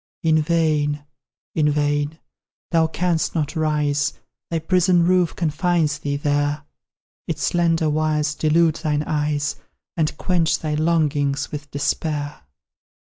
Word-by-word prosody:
In 160 Hz, -1 st, +4 dB
vain 150 Hz, -3 st, +1 dB, 0.5 s
in 150 Hz, -2 st, +2 dB
vain! 145 Hz, +1 st, 0 dB, 0.5 s
Thou 165 Hz, -2 st, +3 dB
canst 170 Hz, +1 st, -1 dB
not 155 Hz, 0 st, -1 dB
rise: 150 Hz, -2 st, +1 dB, 0.4 s
Thy 165 Hz, -, -1 dB
prison 175 Hz, +1 st, +3 dB
roof 180 Hz, -1 st, +2 dB
confines 160 Hz, -2 st, 0 dB
thee 145 Hz, -2 st, -2 dB
there; 145 Hz, 0 st, 0 dB, 0.6 s
Its -, -, -3 dB
slender 165 Hz, -2 st, +2 dB
wires 155 Hz, 0 st, +1 dB
delude 160 Hz, +1 st, +2 dB
thine 150 Hz, -2 st, -1 dB
eyes, 150 Hz, -2 st, -1 dB, 0.4 s
And 155 Hz, -2 st, 0 dB
quench 175 Hz, -3 st, +1 dB
thy 155 Hz, -1 st, -3 dB
longings 150 Hz, -3 st, +1 dB
with 145 Hz, -1 st, -6 dB
despair. 145 Hz, +1 st, -2 dB
155 Hz, 120 wpm, -22 LUFS, 145-165 Hz, 0.6 s, In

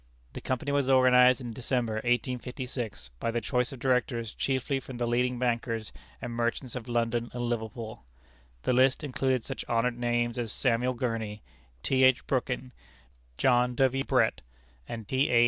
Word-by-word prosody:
The -, -, -7 dB
Company 130 Hz, +3 st, -2 dB
was 140 Hz, -2 st, +1 dB
organized 130 Hz, 0 st, +6 dB
in 120 Hz, -2 st, -5 dB
December, 120 Hz, -2 st, -1 dB
1856, 125 Hz, -, -2 dB
by -, -, -1 dB
the 120 Hz, +1 st, 0 dB
choice 125 Hz, +4 st, 0 dB
of 135 Hz, -, -7 dB
Directors 120 Hz, -3 st, 0 dB
chiefly 135 Hz, 0 st, -1 dB
from 130 Hz, -1 st, -9 dB
the 120 Hz, -, 0 dB
leading 125 Hz, +1 st, +1 dB
bankers 115 Hz, -2 st, -1 dB, 0.3 s
and 120 Hz, -, -5 dB
merchants 120 Hz, +1 st, -2 dB
of 125 Hz, -1 st, -6 dB
London 120 Hz, 0 st, 0 dB
and 120 Hz, 0 st, -3 dB
Liverpool. 110 Hz, -, -4 dB, 0.6 s
The -, -, +2 dB
list 130 Hz, +3 st, +4 dB
included 130 Hz, -3 st, 0 dB
such -, -, -5 dB
honored 120 Hz, +1 st, +1 dB
names 120 Hz, 0 st, 0 dB
as 115 Hz, -3 st, -1 dB
Samuel 125 Hz, 0 st, +1 dB
Gurney, 115 Hz, -3 st, -3 dB, 0.4 s
T. 130 Hz, 0 st, +3 dB
H. 130 Hz, -1 st, +5 dB
Brooking, 125 Hz, -1 st, -1 dB, 0.7 s
John 125 Hz, -1 st, +3 dB
W. 135 Hz, +1 st, +2 dB
Brett, -, -, +2 dB, 0.5 s
and 115 Hz, -3 st, -6 dB
T. 130 Hz, +4 st, +2 dB
A. 120 Hz, -, +5 dB
125 Hz, 160 wpm, -29 LUFS, 115-130 Hz, 0.7 s, organized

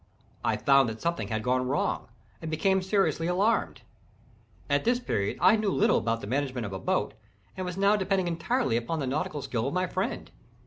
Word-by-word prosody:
I -, -, +1 dB
found 135 Hz, -3 st, +4 dB
that 110 Hz, 0 st, -7 dB
something 170 Hz, 0 st, -2 dB
had 110 Hz, -1 st, -2 dB
gone 125 Hz, +1 st, +1 dB
wrong, 140 Hz, +3 st, -1 dB, 0.3 s
and 160 Hz, -, -5 dB
became 190 Hz, +5 st, +2 dB
seriously 190 Hz, -3 st, +1 dB
alarmed. 200 Hz, +6 st, +1 dB, 0.8 s
At -, -, +1 dB
this 240 Hz, +2 st, +2 dB
period 100 Hz, -, -2 dB
I 185 Hz, +4 st, +6 dB
knew 215 Hz, -2 st, 0 dB
little 210 Hz, +3 st, +3 dB
about 115 Hz, 0 st, -1 dB
the -, -, -6 dB
management 130 Hz, 0 st, -2 dB
of 100 Hz, -, -6 dB
a 95 Hz, -, -4 dB
boat, -, -, -1 dB, 0.4 s
and 185 Hz, -1 st, -4 dB
was 180 Hz, 0 st, -5 dB
now 200 Hz, +1 st, +4 dB
depending 190 Hz, -2 st, 0 dB
entirely 170 Hz, -, 0 dB
upon 120 Hz, +8 st, -2 dB
the 140 Hz, -, -1 dB
nautical 145 Hz, +1 st, -2 dB
skill 120 Hz, 0 st, -2 dB
of 140 Hz, -, -3 dB
my 185 Hz, 0 st, +1 dB
friend. 185 Hz, +1 st, -3 dB
165 Hz, 195 wpm, -28 LUFS, 125-195 Hz, 0.8 s, I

